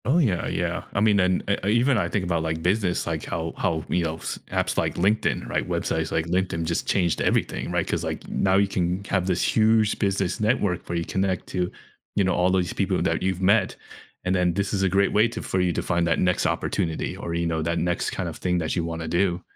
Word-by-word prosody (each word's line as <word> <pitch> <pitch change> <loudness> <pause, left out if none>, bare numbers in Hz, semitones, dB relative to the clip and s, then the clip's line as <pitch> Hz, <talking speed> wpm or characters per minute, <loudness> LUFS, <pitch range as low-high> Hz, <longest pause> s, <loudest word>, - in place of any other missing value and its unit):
Oh, 135 +7 +3
yeah, 110 - +1
yeah. - - -2
I - - +1
mean, 105 -1 +4
and 90 -1 +2 0.2
uh, - - -2
even 120 +5 +3
I - - 0
think 100 -3 -1
about, 85 -2 0
like, 80 0 -2
business, 90 0 +1
like 80 -2 -3
how 80 0 -3
how, 80 -2 -1
you 90 - +1
know, 80 -1 -2
s - - -5
apps - - 0
like - - 0
LinkedIn, 100 +5 +1
right? - - -1
Websites - - -1
like 80 - 0
LinkedIn 90 -1 -1
just 85 0 -2
changed 90 -5 +1
everything, - - 0
right, - - 0
'cause, - - -1
like, - - -4
now 95 -1 +1
you 100 0 +4
can 90 0 -1
have 95 -2 +1
this 90 -2 +1
huge 110 -1 +3
business 95 -3 0
network 105 -5 0
where 85 - -1
you 85 - -2
connect 95 -1 -1
to, 90 -1 -1 0.4
you 100 - +3
know, 95 - +2
all 90 +1 +2
these 90 -3 +1
people - - 0
that - - 0
you've 95 -1 -1
met, 100 +1 +3 0.5
and 90 0 0
then 90 -2 +2
this 100 0 -1
is 100 - 0
a 95 - +3
great 100 +2 +2
way 105 +3 +5
to 115 - -6
for 95 - -1
you 90 -1 +2
to - - -2
find 85 -1 +1
that 80 - +2
next 90 -1 +2
opportunity, 80 -1 -1
or, 85 - -4
you 85 0 0
know, 80 -1 -1
that 85 +1 -1
next 85 +1 0
kind - - -3
of - - -6
thing 90 -1 0
that 80 -3 -1
you 85 - 0
wanna 80 -1 -4
do. 90 0 +1
90 Hz, 240 wpm, -25 LUFS, 85-100 Hz, 0.5 s, way